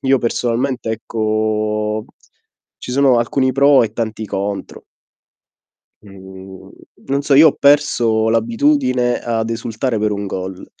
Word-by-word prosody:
io 135 0 +3
personalmente, 120 +1 -2
ecco, 110 -1 -2 0.7
ci - - -8
sono 135 -2 +3
alcuni 130 +2 0
pro 140 0 +5
e 110 -2 -3
tanti 110 -1 -4
contro. 100 0 -5 1.2
Mhmm, 95 -1 -13 0.4
non 140 +1 0
so, 140 -1 +1
io 155 +3 +8
ho - - 0
perso 120 -6 +2
l'abitudine 125 +2 +1
ad 115 -1 -2
esultare 115 +1 -3
per 105 0 0
un 100 0 -4
gol. 95 0 -6
115 Hz, 120 wpm, -17 LUFS, 105-130 Hz, 1.2 s, io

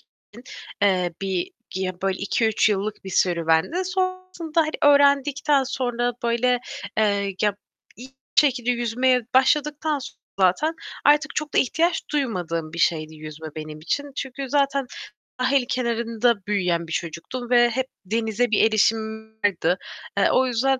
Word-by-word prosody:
için, - - -35 0.7
eee, 185 -3 +2
bir 190 -2 -2 0.2
ya, 185 -1 -3
böyle 195 0 0
2-3 220 +2 +1 0.3
bir 190 - -7
serüvendi. 175 - +1
Sonrasında, 370 -3 -1
hani, 310 -1 -1 0.2
öğrendikten 280 0 +3
sonra 245 -2 -1
böyle, 240 +1 +2 0.4
eee, 200 -2 +1
ya, 210 -2 +2 0.4
iyi 250 +3 -11 0.3
şekilde 250 -4 +3
yüzmeye 245 +2 +1
başladıktan 295 +3 +2
sonra 260 - -10 0.2
zaten 195 - +2 0.3
artık 295 +1 +4
çok 305 -1 -3
da - - +2
ihtiyaç 330 +7 +1
duymadığım 175 - -2
bir 170 - -6
şeydi 155 -2 +1
yüzme 155 +1 -9
benim 155 -1 -7
için. 285 - -3
Çünkü 265 0 -5
zaten 275 -1 +1 0.6
sahil 260 0 +2
kenarında 235 -1 +1
büyüyen 180 -5 0
bir - - -10
çocuktum 170 +11 -5
ve 240 -1 +5
hep 260 +2 -2 0.2
denize 225 +3 0
bir 210 - +4
erişimim 220 0 0
vardı. 180 -2 +1 0.4
Eee, 200 - +4
o 260 - +3
yüzden 260 +2 +1
235 Hz, 135 wpm, -23 LUFS, 190-275 Hz, 0.7 s, ve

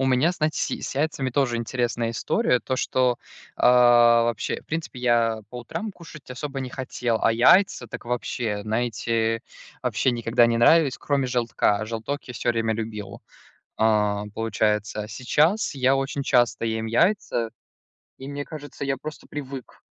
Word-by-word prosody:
У 135 - +1
меня, 130 +7 +3
знаете, 155 -3 -1
с - - +1 0.2
с - - -6
яйцами 140 -2 -1
тоже 125 -2 +1
интересная 120 -1 -1
история, 125 - +1
то, 130 - -2
что, 125 -1 +1 0.4
а, 120 -1 +6
вообще 115 -2 -2
В - - -35
принципе, 160 -5 -4
я 115 -2 +2
по 125 - -7
утрам 205 - -5
кушать 150 -6 -13
особо 135 +2 -5
не 130 - -4
хотел, 120 -3 -2
а 115 - +4
яйца- 125 - +4
так - - -8
вообще, 120 -3 -2
знаете, 115 0 -1 0.4
вообще 130 - +1
никогда 120 0 +2
не 115 0 +1
нравились, 145 +2 +4
кроме 140 -2 0
желтка. 115 -4 0
Желток 115 +6 -4
я 125 - -9
всё 120 - -3
время 115 -1 0
любил, 105 -3 -6 0.6
а, 105 -2 +2
получается. 105 -1 -1
А - - -8
сейчас 150 - +1
я 130 0 +3
очень 135 +1 -2
часто 120 -3 +2
ем 110 0 -2
яйца 120 - +1 0.7
и, 135 - -8
мне 145 0 -5
кажется, 145 -3 -8
я 135 0 -1
просто 155 +4 -9
привык. 135 -3 -8
120 Hz, 160 wpm, -24 LUFS, 115-135 Hz, 0.7 s, а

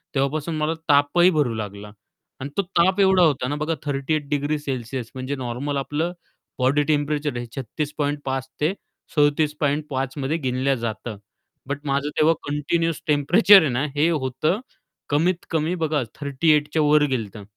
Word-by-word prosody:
तेव्हापासून 150 +4 -1
मला 155 +1 0 0.2
तापही 145 +5 +5
भरू 125 -6 +2
लागला 105 -1 -6 0.5
आणि 135 +2 -5
तो - - +4 0.2
ताप 185 +3 +3
एवढा 190 -2 +5
होता 140 -5 +2
ना 145 - -2
बघा 155 +2 -1
38 145 +1 -1
डिग्री 145 +1 0
सेल्सिअस. 130 -3 -5
म्हणजे 130 +2 -3
नॉर्मल 130 +3 -3
आपलं 150 +5 -2 0.5
बॉडी 140 +4 +3
टेम्परेचर 145 -2 0
हे 120 - -4
36.5 145 -1 -3
ते 160 +6 +2 0.4
37.5 145 -2 +1
मध्ये 140 +4 -1
गिणल्या 130 -1 0
जातं, 115 -2 -5 0.5
बट 140 0 -3
माझं 140 +1 0
तेव्हा 160 +2 +5 0.2
कंटिन्यूअस 165 +3 -1
टेम्परेचर 175 +8 +6
आहे 155 - +1
ना 130 +4 0
हे 155 +4 +3
होतं 155 - 0 0.5
कमीत 170 +5 +1
कमी 160 +2 0
बघा 150 -3 +1 0.2
38 150 +2 +2
च्या 160 - +2
वर 150 0 +4
गेलं 130 -6 0
होतं. 100 0 -11
145 Hz, 150 wpm, -23 LUFS, 135-155 Hz, 0.5 s, टेम्परेचर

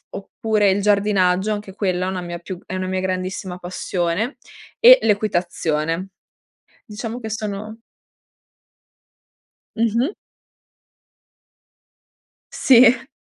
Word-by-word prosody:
oppure 210 0 -1
il 195 +1 0
giardinaggio 200 -1 +2
anche 205 -2 -8
quella 185 -3 -1
è - - -2
una 185 -1 -4
mia 175 0 -6
più 180 +1 -7
è 185 - -6
una 185 0 -3
mia 185 0 -1
grandissima 185 0 -3
passione, 180 - -2 0.4
e - - +9
l'equitazione. 175 -4 -1 0.8
Diciamo 225 +2 -6
che 220 -2 -6
sono 215 +1 -5 2.0
Mh-mh. 230 - 0 2.4
Sì. 250 0 +5
200 Hz, 95 wpm, -21 LUFS, 185-220 Hz, 2.4 s, e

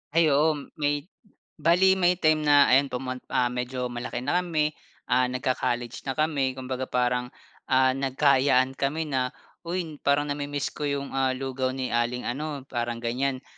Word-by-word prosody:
Ay 165 -3 +5
oo, 150 +2 +3 0.2
may 145 -1 0 0.6
bale 180 +4 +4
may 180 0 +4
time 155 -3 +3
na, 145 -1 +6
ayan 135 +2 +5
pumun 130 0 -4
ah, 125 -1 +1
medyo 125 0 -3
malaki 120 0 -5
na 175 +7 +2
kami, 155 -4 0 0.4
ah, 125 0 +4
nagka-college 125 -2 -2
na 135 - -1
kami, 145 -4 0
kumbaga 130 0 -4
parang, 125 0 0 0.4
ah, 130 0 +4
nagka-ayaan 135 -1 +3
kami 150 +4 -1
na, 130 -1 0 0.3
"Uy, 170 -4 -3
parang 145 +1 +1
nami-miss 145 0 -3
ko 150 - -4
'yong, 140 -1 -3
ah, 130 -1 +1
lugaw 130 0 -2
ni 130 -1 -3
aling 120 +1 0
ano," 145 +1 -4
parang 120 -1 -3
ganiyan. 130 +3 -1
135 Hz, 160 wpm, -26 LUFS, 125-145 Hz, 0.6 s, na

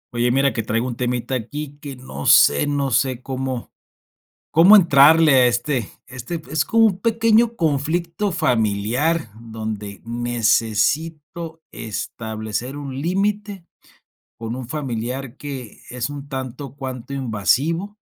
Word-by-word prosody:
Oye, 120 +1 +2
mira 135 0 +2
que 115 - -1
traigo 115 +2 -1
un 120 - -4
temita 125 +1 -2
aquí 145 +4 -5
que 140 -2 -7
no 125 - -7
sé 70 - +6
no 140 -2 -1
sé 130 0 +1
cómo 130 -2 -4 0.8
cómo 175 +7 +8
entrarle 160 -3 +6
a 130 -1 +6
este 120 0 0 0.2
este, 125 +7 -6
pues 160 - -14
es 155 -1 +1
como 225 0 +4
un 190 -3 -4
pequeño 230 +1 +3
conflicto 170 +5 -1
familiar, 120 - 0
donde 110 -3 -6
necesito 125 - -1
establecer 110 +3 -5
un 140 -2 -6
límite 195 +3 -1 0.7
con 115 +1 -5
un 130 -2 -6
familiar 130 -2 -4
que 135 -7 -8
es 120 -1 -3
un 145 0 -8
tanto 130 0 -6
cuanto 130 -2 -6
invasivo 140 - 0
135 Hz, 130 wpm, -21 LUFS, 120-160 Hz, 0.8 s, cómo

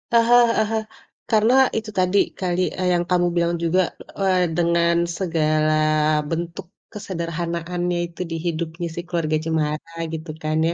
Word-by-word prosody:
Aha, 235 +1 +5
heeh 220 -1 +2
heeh. 220 -1 0 0.5
Karena 220 +2 +4 0.2
itu 220 -1 -4
tadi 185 +2 +2 0.2
kali, 180 -1 -1 0.2
eee, 185 -1 0
yang 175 0 +1
kamu 175 -1 +3
bilang 170 0 +1
juga, 170 +2 +2 0.4
eee, 190 -2 +2 0.2
dengan 170 0 +2 0.2
segala 155 -3 +1 0.6
bentuk 170 +3 -4 0.3
kesederhanaannya 175 -2 -3
itu 170 +1 -10
di 165 - -2
hidupnya 170 +1 -3
si - - -4
Keluarga 165 -3 -1
Cemara 155 0 -2 0.2
gitu 160 +1 -6
kan 155 0 0
ya. 170 - -1
170 Hz, 145 wpm, -22 LUFS, 165-185 Hz, 0.6 s, Aha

